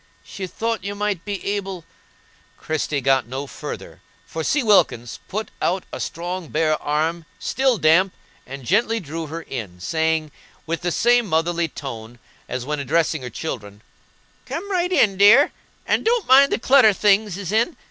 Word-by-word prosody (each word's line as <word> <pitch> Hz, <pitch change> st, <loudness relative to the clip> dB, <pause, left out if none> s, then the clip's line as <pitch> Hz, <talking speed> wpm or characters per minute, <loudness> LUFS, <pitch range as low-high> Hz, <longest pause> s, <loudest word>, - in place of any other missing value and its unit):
She 190 Hz, -1 st, -7 dB
thought 225 Hz, +2 st, -3 dB
you 200 Hz, +1 st, -4 dB
might 205 Hz, -4 st, -2 dB
be 200 Hz, -2 st, -5 dB
able"— 195 Hz, -4 st, -3 dB, 0.7 s
Christie 155 Hz, -2 st, -2 dB
got 135 Hz, -2 st, +2 dB
no 135 Hz, +3 st, -4 dB
further, -, -, -8 dB, 0.2 s
for 160 Hz, -, -5 dB
C. 290 Hz, -, +1 dB
Wilkins 155 Hz, -, +2 dB
put 215 Hz, +3 st, -4 dB
out 185 Hz, +2 st, 0 dB
a -, -, -5 dB
strong 175 Hz, 0 st, -4 dB
bare 155 Hz, 0 st, 0 dB
arm, 160 Hz, +3 st, -1 dB
still 265 Hz, -3 st, +1 dB
damp, 175 Hz, +3 st, +4 dB, 0.4 s
and 135 Hz, 0 st, -8 dB
gently 225 Hz, -, +2 dB
drew 160 Hz, -2 st, -6 dB
her 165 Hz, +2 st, -6 dB
in, 105 Hz, -, -7 dB
saying, 160 Hz, -, 0 dB, 0.3 s
with 165 Hz, +1 st, -3 dB
the 175 Hz, 0 st, -1 dB
same 240 Hz, +4 st, +3 dB
motherly 170 Hz, 0 st, +1 dB
tone 120 Hz, -5 st, -8 dB, 0.3 s
as 125 Hz, 0 st, -4 dB
when 150 Hz, +1 st, -2 dB
addressing 160 Hz, +2 st, 0 dB
her 125 Hz, -, -6 dB
children, 105 Hz, -6 st, -6 dB, 0.6 s
"Come 400 Hz, +5 st, -5 dB
right 360 Hz, -1 st, 0 dB
in, 210 Hz, -, +3 dB
dear, 210 Hz, +9 st, +7 dB, 0.3 s
and -, -, +1 dB
don't 465 Hz, -2 st, +1 dB
mind 275 Hz, +2 st, +7 dB
the -, -, +2 dB
clutter 255 Hz, -4 st, +5 dB
things 205 Hz, -1 st, +2 dB
is 200 Hz, -2 st, -5 dB
in. 230 Hz, +10 st, +1 dB
170 Hz, 165 wpm, -22 LUFS, 150-210 Hz, 0.7 s, dear